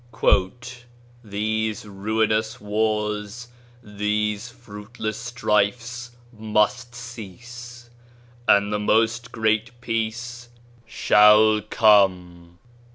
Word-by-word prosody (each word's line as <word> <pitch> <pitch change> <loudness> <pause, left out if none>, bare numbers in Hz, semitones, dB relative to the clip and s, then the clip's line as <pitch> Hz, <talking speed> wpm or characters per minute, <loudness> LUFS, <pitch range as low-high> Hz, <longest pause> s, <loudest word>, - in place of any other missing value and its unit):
16 120 +6 0 0.4
"These 110 +1 -2
ruinous 110 +2 -1
wars, 105 +2 -2 0.3
these 105 +2 -2
fruitless 110 -1 -7
strifes 120 +1 -1 0.2
must 110 +3 0
cease: 120 +1 -10 0.6
and 100 +1 +4
the 105 - 0
Most 115 +3 +1
Great 110 +2 -1
Peace 120 +1 -4 0.4
shall 105 +1 +5
come 90 -5 +2
110 Hz, 75 wpm, -23 LUFS, 105-120 Hz, 0.6 s, shall